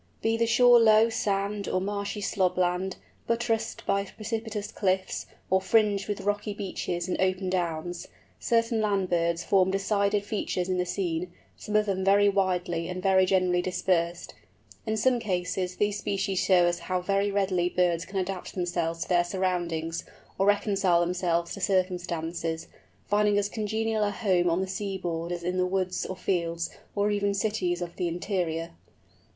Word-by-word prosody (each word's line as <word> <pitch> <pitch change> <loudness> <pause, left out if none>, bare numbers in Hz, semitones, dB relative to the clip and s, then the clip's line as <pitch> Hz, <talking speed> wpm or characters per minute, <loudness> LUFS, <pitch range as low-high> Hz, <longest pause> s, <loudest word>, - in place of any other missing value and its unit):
Be 225 0 +2
the 230 0 +1
shore 245 +1 +6
low 220 0 +6
sand 200 -2 -1
or 185 - +1
marshy 200 +2 -3
slob 185 -3 0
land, 180 +1 0 0.3
buttressed 230 -1 -1
by 200 0 +1
precipitous 215 0 -5
cliffs, 185 -1 -1 0.2
or 190 0 +4
fringed 205 -1 +2
with 205 -1 -3
rocky 205 +1 -2
beaches 180 -3 -3
and 185 - -1
open 185 0 0
downs, 175 -1 -2 0.3
certain 230 -1 +1
land 200 -3 0
birds 170 0 +1
form 190 -2 +3
decided 200 +1 +1
features 195 -3 -2
in 185 -1 0
the 180 - 0
scene, 175 -2 -2 0.2
some 210 - -5
of 215 0 +4
them 190 -2 -1
very 200 +1 +5
widely 180 -3 0
and 180 0 -5
very 190 -1 +4
generally 185 -2 +2
dispersed. 175 -1 -1 0.5
In 220 0 0
some 245 +3 +3
cases 180 -3 -2
these 205 0 0
species 195 -2 -1
show 180 -2 +5
us 175 0 0
how 185 -1 -2
very 195 +2 +1
readily 190 -3 +1
birds 175 -2 +1
can 195 +1 -6
adapt 190 0 -3
themselves 175 -2 -1
to - - -13
their 175 -1 +4
surroundings, 175 -3 -2 0.4
or 195 - +3
reconcile 195 -4 +3
themselves 175 -1 0
to 200 - -7
circumstances, 175 -3 -1 0.4
finding 205 0 +2
as 205 0 +1
congenial 220 0 -1
a 205 - +2
home 190 -4 +1
on 170 +3 +1
the 190 - -2
seaboard 185 -4 -3
as 175 -1 -4
in 180 +1 -1
the 180 0 +2
woods 185 -1 -1
or 185 - -4
fields, 170 -3 -1 0.2
or 205 0 +2
even 200 -1 0
cities 185 -4 -1
of 170 -1 -8
the 180 - 0
interior. 170 -2 -2
190 Hz, 165 wpm, -27 LUFS, 175-205 Hz, 0.5 s, shore